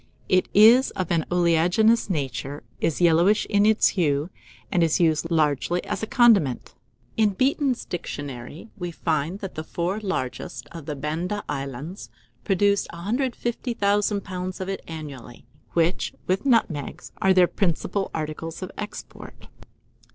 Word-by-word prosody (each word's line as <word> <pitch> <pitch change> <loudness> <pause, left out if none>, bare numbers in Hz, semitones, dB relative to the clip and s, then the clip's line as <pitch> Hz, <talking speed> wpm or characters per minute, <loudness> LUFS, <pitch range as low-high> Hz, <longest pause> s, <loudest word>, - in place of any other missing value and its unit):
It 185 0 +3
is 230 +6 +7
of 185 -2 -3
an 165 -2 +1
oleaginous 180 +7 +3
nature, 145 -3 -3 0.2
is 165 +1 -1
yellowish 175 +5 +4
in 205 0 +4
its 220 -1 +4
hue, 150 -2 0 0.4
and 175 - +2
is 165 -2 +2
used 165 -1 +2
largely 160 +1 +1
as - - -4
a 220 - -3
condiment. 205 - +3 0.4
In 210 -3 +3
"Beeton's 265 +1 +1
Dictionary" 145 - -7
we 175 -1 -4
find 160 +1 -1
that 195 -2 -5
the 155 - -5
four 175 +5 -2
largest 130 - -4
of 165 -4 -9
the 150 - -3
Banda 165 +8 -3
Islands 140 +5 -5 0.3
produce 200 +1 +2
150,000 210 0 -1
lbs. 185 -1 -5
of 185 - -4
it 195 - -3
annually, 140 -8 -9 0.3
which, 170 +2 0
with 190 +8 0
nutmegs, 180 - 0
are 190 - +4
their 185 -1 +6
principal 195 +2 -1
articles 160 +2 -5
of 185 - -6
export. 210 0 -9
175 Hz, 135 wpm, -24 LUFS, 155-205 Hz, 0.4 s, is